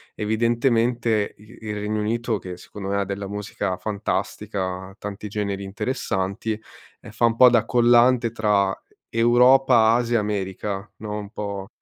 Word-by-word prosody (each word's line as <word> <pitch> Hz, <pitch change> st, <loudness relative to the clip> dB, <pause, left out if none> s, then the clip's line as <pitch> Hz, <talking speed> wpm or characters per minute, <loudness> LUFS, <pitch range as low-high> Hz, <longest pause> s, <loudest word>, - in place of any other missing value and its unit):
evidentemente 115 Hz, 0 st, +1 dB
i 110 Hz, +3 st, -16 dB
il 105 Hz, -1 st, -4 dB
Regno 105 Hz, +1 st, -2 dB
Unito, 115 Hz, +1 st, -1 dB
che 90 Hz, -2 st, -8 dB
secondo 100 Hz, +2 st, -9 dB
me 100 Hz, -, 0 dB
ha -, -, -1 dB
della 100 Hz, +1 st, -4 dB
musica 105 Hz, -2 st, -3 dB
fantastica, 95 Hz, -2 st, -3 dB
tanti 105 Hz, +1 st, -6 dB
generi 100 Hz, -1 st, -3 dB
interessanti, 105 Hz, -1 st, -3 dB, 0.4 s
ehm, -, -, -11 dB
fa 115 Hz, +2 st, +1 dB
un 115 Hz, -1 st, +2 dB
po' 125 Hz, +1 st, +7 dB
da 115 Hz, -2 st, +3 dB
collante 120 Hz, 0 st, +4 dB
tra 105 Hz, -4 st, +1 dB, 0.3 s
Europa, 120 Hz, 0 st, +5 dB
Asia, 120 Hz, 0 st, +1 dB
America, 100 Hz, 0 st, -3 dB
no, 105 Hz, 0 st, -5 dB
un 100 Hz, -1 st, -8 dB
po' 100 Hz, -2 st, -5 dB
105 Hz, 140 wpm, -23 LUFS, 100-115 Hz, 0.4 s, po